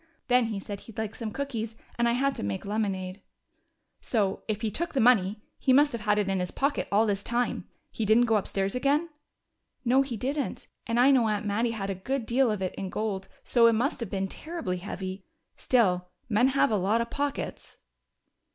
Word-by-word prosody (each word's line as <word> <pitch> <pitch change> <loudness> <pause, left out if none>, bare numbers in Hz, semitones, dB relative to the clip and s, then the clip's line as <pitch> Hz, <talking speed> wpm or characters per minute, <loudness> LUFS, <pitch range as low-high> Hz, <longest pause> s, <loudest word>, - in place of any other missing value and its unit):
Then 250 -1 +5
he 215 -3 -3
said 200 0 -6
he'd 225 - -14
like 220 -1 -3
some 225 -2 -5
cookies, 230 -4 -4 0.2
and 235 0 +2
I - - +2
had 275 +3 +1
to - - -6
make 100 -1 -3
lemonade." 195 -2 -2 0.8
"So, 200 -5 0
if 215 0 -2
he 220 - 0
took 340 +8 -3
the 275 - +1
money, 215 -3 +4 0.2
he 260 - +3
must 290 +2 +5
have 235 - -4
had 210 0 +2
it 205 -2 +1
in 195 -1 0
his 180 -1 -1
pocket 280 +1 -1
all 210 +3 +4
this 200 -2 -1
time? 240 +1 -1 0.2
He 225 - -3
didn't 220 +3 +5
go 225 -2 +3
upstairs 195 -1 -1
again?" 285 +6 +1 0.8
"No, 255 +3 +5
he 265 -4 -3
didn't. 275 +4 -3 0.2
And 230 +1 +1
I 260 +3 +6
know 250 -4 +4
Aunt 210 -1 -1
Mattie 215 +4 +1
had 200 -4 -3
a - - 0
good 235 +7 -3
deal 245 +2 +3
of 210 -3 -1
it 185 - -2
in 195 - -5
gold, 200 -2 -3 0.2
so 235 -2 +5
it 230 - +5
must 245 +8 0
have 230 -5 -4
been 195 -1 -1
terribly 305 - -4
heavy. 190 +1 -6 0.3
Still, 180 -8 +2 0.2
men 235 +2 +3
have 270 -3 +3
a 215 - +3
lot 200 +5 +2
of 235 - -4
pockets." 285 -1 -4
220 Hz, 210 wpm, -28 LUFS, 200-250 Hz, 0.8 s, I